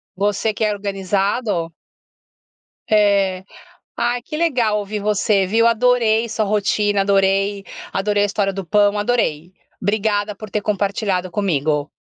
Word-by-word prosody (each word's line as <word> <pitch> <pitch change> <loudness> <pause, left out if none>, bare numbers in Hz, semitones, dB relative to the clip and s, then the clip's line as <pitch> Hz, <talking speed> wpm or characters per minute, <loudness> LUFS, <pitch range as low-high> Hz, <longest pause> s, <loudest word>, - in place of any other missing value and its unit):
Você 205 +3 0
que 215 - -3
é 215 - +2
organizado. 195 -2 -2 1.2
É, 200 -3 +2 0.5
ai 240 0 -1
que 305 - -7
legal 245 -10 +1
ouvir 205 +1 -4
você 205 -1 +1
viu, 230 +4 +3
adorei 230 -1 +2
sua 220 -1 -1
rotina, 205 0 +1
adorei, 195 0 +1 0.3
adorei 205 +1 +1
a - - +4
história 200 -1 -1
do 195 -1 -5
pão, 205 +3 +2
adorei. 190 -7 -1 0.3
Obrigada 205 +1 0
por 215 0 -10
ter 210 - -2
compartilhado 200 -2 -1
comigo. 155 -6 -1
205 Hz, 130 wpm, -19 LUFS, 195-215 Hz, 1.2 s, a